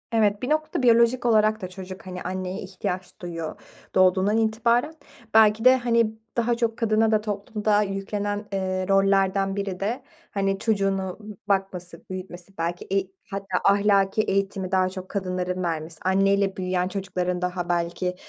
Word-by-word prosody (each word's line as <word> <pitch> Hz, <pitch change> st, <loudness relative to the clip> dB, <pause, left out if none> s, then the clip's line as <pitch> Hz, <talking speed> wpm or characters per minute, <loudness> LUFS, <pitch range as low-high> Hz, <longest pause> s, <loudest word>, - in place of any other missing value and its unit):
Evet 210 Hz, -2 st, +2 dB
bir 255 Hz, -, -3 dB
noktada 310 Hz, -3 st, 0 dB
biyolojik 235 Hz, +1 st, +4 dB
olarak 215 Hz, -1 st, +3 dB
da 185 Hz, -, -3 dB
çocuk 185 Hz, 0 st, -9 dB
hani 180 Hz, 0 st, -6 dB
anneye 185 Hz, 0 st, -4 dB
ihtiyaç 185 Hz, -1 st, -5 dB
duyuyor, 165 Hz, -3 st, -5 dB, 0.4 s
doğduğundan 185 Hz, +3 st, +4 dB
itibaren. 235 Hz, +6 st, +2 dB, 0.4 s
Belki 220 Hz, +1 st, +5 dB
de 255 Hz, 0 st, +8 dB
hani 235 Hz, -3 st, +2 dB, 0.3 s
daha 235 Hz, 0 st, +2 dB
çok 230 Hz, -1 st, -1 dB
kadına 220 Hz, -1 st, +2 dB
da 215 Hz, -1 st, +3 dB
toplumda 210 Hz, 0 st, 0 dB
yüklenen, 205 Hz, +1 st, -3 dB
eee, 185 Hz, -1 st, -1 dB
rollerden 195 Hz, 0 st, +2 dB
biri 200 Hz, -2 st, -3 dB
de 230 Hz, +7 st, -2 dB, 0.3 s
hani 195 Hz, -1 st, 0 dB
çocuğunu 195 Hz, -3 st, 0 dB, 0.3 s
bakması, 180 Hz, -3 st, -2 dB
büyütmesi 185 Hz, 0 st, -8 dB
belki 170 Hz, +1 st, -3 dB
eğ 195 Hz, -1 st, +1 dB, 0.2 s
hatta 195 Hz, -2 st, -2 dB
ahlaki 200 Hz, 0 st, +3 dB
eğitimi 195 Hz, -2 st, -1 dB
daha 185 Hz, -1 st, +3 dB
çok 185 Hz, 0 st, -8 dB
kadınların 185 Hz, -2 st, -2 dB
vermesi, 160 Hz, -1 st, -3 dB
anneyle 195 Hz, +1 st, +2 dB
büyüyen 185 Hz, -1 st, 0 dB
çocukların 180 Hz, -2 st, -2 dB
daha 180 Hz, -1 st, -2 dB
belki, 175 Hz, +1 st, -1 dB
195 Hz, 145 wpm, -25 LUFS, 185-215 Hz, 0.4 s, de